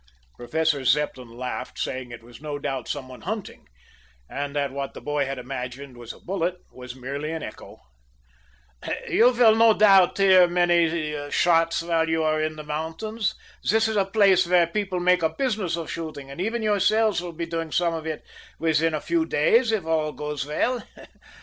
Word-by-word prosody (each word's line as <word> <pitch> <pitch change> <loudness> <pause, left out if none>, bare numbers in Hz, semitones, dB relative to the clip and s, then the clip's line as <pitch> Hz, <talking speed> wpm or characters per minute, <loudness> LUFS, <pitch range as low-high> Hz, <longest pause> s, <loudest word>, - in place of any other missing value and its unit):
Professor 150 +3 -1
Zepplin 130 -2 0
laughed, 125 0 -5
saying 130 -1 -4
it 120 -1 -10
was 120 +1 -14
no 150 -1 -4
doubt 135 -4 -4
some 140 -3 -4
one 130 -1 -12
hunting, 210 +2 -6 0.6
and 140 - -5
that 140 -2 0
what 140 0 -5
the - - -7
boy 145 -2 -1
had 135 0 -4
imagined 125 +1 -6
was 120 -1 -9
a - - -14
bullet 180 -1 -2 0.2
was 125 -1 -10
merely 140 +4 -5
an 160 -1 -4
echo. - - -10 1.3
"You 240 +2 +5
no 225 -2 +6
doubt 195 -4 +5
will 195 - +3
hear 185 -2 +7
many 170 -4 +1
shots 165 0 +2
while 165 -1 +1
you 160 0 +1
are 155 0 +1
in 155 0 -2
the 155 - -8
mountains. 165 +9 -3 0.3
This 220 +1 +3
is 220 - -2
a 200 - +3
place 195 -3 +4
where 175 -1 +4
people 190 +1 -2
make 180 0 +3
a 160 - +2
business 210 -4 -1
of 165 -2 -5
shooting, 155 -4 -6
and 140 - -6
even 225 +3 -2
yourselves 215 0 +2
will 175 -1 -6
be 170 +1 -4
doing 165 -1 -4
some 170 0 +1
of 160 -1 -5
it 155 -1 -5 0.3
within 160 0 +1
a 150 - -3
few 170 -1 0
days, 225 - +3
if 215 -6 -1
all 155 -2 0
goes 150 -1 -4
well. 240 +11 0
160 Hz, 185 wpm, -24 LUFS, 145-185 Hz, 1.3 s, hear